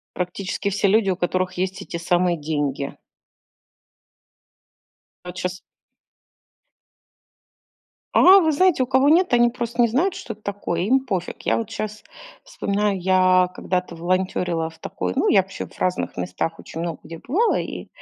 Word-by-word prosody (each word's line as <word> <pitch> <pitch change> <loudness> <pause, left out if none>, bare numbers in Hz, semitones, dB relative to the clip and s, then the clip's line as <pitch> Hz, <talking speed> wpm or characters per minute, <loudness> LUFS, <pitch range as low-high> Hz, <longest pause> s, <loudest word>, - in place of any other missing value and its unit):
Практически 185 +2 -3
все 200 +1 +1
люди, 200 0 +3
у 185 - 0
которых 185 +1 -1
есть 190 +2 -3
эти 170 - -6
самые 175 +1 +1
деньги. 145 -2 -2 2.3
А, - - -9
вот 180 +1 -8
щас 180 0 -3 2.6
А, 380 +2 +8
вы 320 -4 +2
знаете, 325 -3 +3
у - - -8
кого 265 +2 +3
нет, 345 +2 +4
они 240 0 +5
просто 240 0 -1
не 235 - +4
знают, 325 - +1
что 225 - -7
это 215 - -27
такое. 200 -4 -3
Им 255 +8 +3
пофиг. 190 -8 -4
Я - - +1
вот 225 -3 -3
щас 215 0 -5 0.4
вспоминаю, 200 0 -1
я 185 0 +4
когда-то 180 -2 -3
волонтёрила 175 -1 -1
в 160 - -19
такой 90 0 -4
ну, - - +2
я 195 -3 +5
вообще 195 +1 -7
в - - -19
разных 180 0 -1
местах, 90 - -3
очень 165 - -8
много 170 -2 -4
где 165 - -9
бывала. 380 - +1
И, - - -6
185 Hz, 155 wpm, -22 LUFS, 175-230 Hz, 2.6 s, А